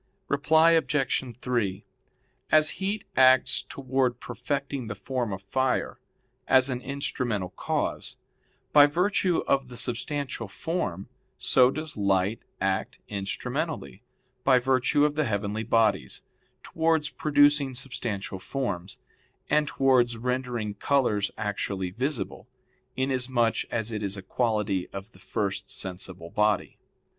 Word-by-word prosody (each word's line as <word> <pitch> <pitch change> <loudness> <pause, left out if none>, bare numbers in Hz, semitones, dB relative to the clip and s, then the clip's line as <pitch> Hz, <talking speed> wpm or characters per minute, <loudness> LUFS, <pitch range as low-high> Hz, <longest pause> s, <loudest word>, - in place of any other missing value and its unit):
Reply 160 +3 +5
Obj. 135 -6 +1
3: 115 -6 -1 0.7
As 155 0 +5
heat 200 +2 -2
acts 130 -1 +5
towards 130 -2 -1
perfecting 135 +1 -3
the 105 - -4
form 120 +2 -3
of 95 0 -5
fire, 130 +5 0 0.5
as 130 0 +5
an 125 -1 -3
instrumental 125 -8 -2
cause, - - -2 0.6
by 145 -1 +9
virtue 180 +2 +1
of 135 -1 +2
the 125 -1 -9
substantial 125 0 -3
form, 100 - -3 0.3
so 125 -1 +5
does 155 0 -5
light 100 +1 +1 0.2
act 95 0 -1
instrumentally, 100 -2 -3 0.4
by 130 -2 +5
virtue 130 +3 +3
of 150 - +1
the 155 0 0
heavenly 105 -1 -1
bodies, 110 - +1 0.4
towards 160 -2 +1
producing 145 -2 +3
substantial 120 -7 -4
forms; 95 -4 -3 0.5
and 150 0 +3
towards 125 -4 +3
rendering 125 -3 -2
colors 105 -5 +1
actually 100 -3 -2
visible, 125 -1 -3 0.5
inasmuch 130 -3 +1
as 115 0 -2
it 105 -1 -3
is 100 -1 -2
a 95 - -7
quality 105 -4 0
of 100 +3 -8
the - - -19
first 100 -2 -3
sensible 90 -2 -5
body. 105 0 +1
125 Hz, 120 wpm, -27 LUFS, 105-140 Hz, 0.7 s, by